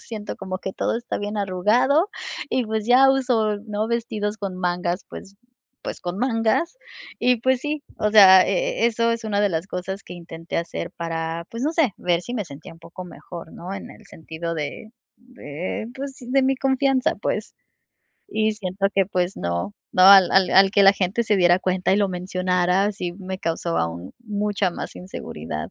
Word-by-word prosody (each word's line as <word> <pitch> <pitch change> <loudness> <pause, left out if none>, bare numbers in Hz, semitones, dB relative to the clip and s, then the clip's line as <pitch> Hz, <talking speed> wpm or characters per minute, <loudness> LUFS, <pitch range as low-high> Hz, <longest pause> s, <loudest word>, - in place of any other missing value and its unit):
siento 215 -3 -7
como 185 -1 -5
que 190 - -5
todo - - -1
está 240 - -4
bien 205 +1 -4
arrugado, 230 - +2 0.4
y 255 - +1
pues 220 0 -2
ya 260 +2 +6
uso, 240 -6 +1
¿no?, 210 +1 -2
vestidos 220 -3 -2
con 195 -3 -4
mangas 180 0 -2
pues 195 0 -11 0.5
pues - - -6
con 180 +2 -4
mangas 235 - 0 0.4
y 250 0 +3
pues 260 +2 +1
sí, 295 +1 -3 0.2
o 210 - +1
sea, 190 -3 +9
e - - -1
e - - +7
eso 230 0 +1
es 230 - -4
una 205 -2 0
de 205 - +3
las 165 +1 -2
cosas 190 +2 -5
que 180 - -10
intenté 165 -1 -7
hacer 170 0 -4
para 165 0 -4
pues 230 +2 -5
no 305 - 0
sé, 315 - +2
ver 175 -1 0
si 240 - -6
me 215 -4 -2
sentía 145 +1 -11
un 165 - -20
poco 170 +2 -10
mejor, 175 -1 -10
¿no?, 180 +3 -8
en 195 - -8
el - - -15
sentido 165 +1 -6
de 155 +8 -5 0.3
de, 215 - -6
pues, 270 0 -6
de 260 +2 +1
mi 265 0 +2
confianza 265 -1 +1
pues. - - -2 0.8
Y 220 - +1
siento 195 -2 -2
que, 195 -2 +3
pues, 180 -1 -1
no, 85 - -3 0.2
no, 185 - +3
al 190 -2 +9
al 190 -1 +4
al 195 0 +6
Que 200 0 +4
la 195 0 +8
gente 195 +4 0
se 210 -1 +2
diera 175 -1 +4
cuenta 185 -1 0
y - - +4
lo 205 -1 +2
mencionara, 185 +2 0
sí 180 -3 -4
me 190 0 -6
causó 165 -1 -2
aún 85 +2 -3
mucha 205 -3 -1
más - - -7
inseguridad. 80 - -7
195 Hz, 190 wpm, -23 LUFS, 180-230 Hz, 0.8 s, sea